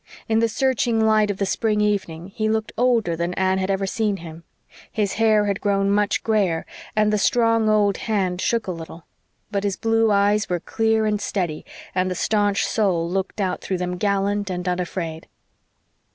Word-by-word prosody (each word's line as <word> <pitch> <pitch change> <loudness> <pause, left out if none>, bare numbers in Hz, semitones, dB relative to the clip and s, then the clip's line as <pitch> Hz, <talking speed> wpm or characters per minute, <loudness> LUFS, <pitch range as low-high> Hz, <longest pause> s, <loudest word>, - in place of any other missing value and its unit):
In 220 0 +2
the 230 0 +2
searching 245 -1 +1
light 215 -1 +3
of 200 - -2
the 200 - 0
spring 210 +2 0
evening 195 -5 -1
he 215 +2 -2
looked 220 0 -1
older 230 -8 +2
than 170 +2 -2
Anne 190 0 +1
had 190 0 -2
ever 195 0 0
seen 210 0 -1
him. 165 -1 -10 0.5
His 205 -3 -1
hair 215 -2 +4
had 200 -1 -1
grown 200 -1 +1
much 205 0 +1
grayer, 200 -7 +1 0.3
and 215 0 +2
the 210 - +2
strong 230 0 +2
old 205 -2 +3
hand 190 -5 -1
shook 230 -2 0
a 185 - -3
little. 165 -1 -9 0.5
But 200 -1 -1
his 200 -2 -1
blue 225 0 +2
eyes 205 +1 +2
were 175 -1 0
clear 220 +4 0
and 210 -1 0
steady, 175 -7 -3 0.3
and 185 0 0
the 180 - -3
staunch 205 +2 +1
soul 185 -6 +1
looked 190 +4 -3
out 185 -2 -1
through 190 - -2
them 180 0 -3
gallant 200 +1 0
and 180 0 -4
unafraid. 175 -2 -3
200 Hz, 185 wpm, -22 LUFS, 185-215 Hz, 0.5 s, hair